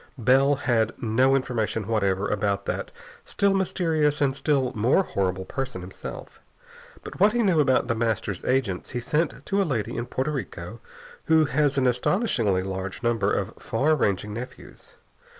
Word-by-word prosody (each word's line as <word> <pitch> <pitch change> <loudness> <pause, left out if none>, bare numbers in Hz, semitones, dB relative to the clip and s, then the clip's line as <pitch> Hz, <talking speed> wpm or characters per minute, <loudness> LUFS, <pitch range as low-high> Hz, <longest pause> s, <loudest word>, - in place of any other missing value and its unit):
Bell 135 +4 +4
had 120 -5 +1
no 125 +4 +3
information 115 -5 -1
whatever 100 -3 0
about 100 -1 -1
that - - -3 0.3
still 200 -1 +1
mysterious 160 -6 +1
and 135 -2 +1
still 140 -3 +1
more 125 - +3
horrible 95 - -2
person 135 -7 -4
himself. 90 +1 -9 0.6
But - - -9
what 210 +1 +5
he 240 -1 +2
knew 185 -6 +3
about 130 -3 +3
The 115 - +1
Master's 110 -4 -2
agents 125 -9 0
he 120 - -3
sent 150 +2 -1
to 200 +1 +1
a - - +3
lady 120 - -2
in 120 +1 -3
Porto 130 +4 -2
Rico 115 - -6 0.5
who 160 -1 +4
has 145 -1 +1
an 130 - +2
astonishingly 125 - +1
large 95 +2 -5
number 115 -4 +1
of - - -1
far 155 +3 +1
ranging 105 -5 -1
nephews. 120 +4 -9
125 Hz, 160 wpm, -25 LUFS, 105-145 Hz, 0.6 s, what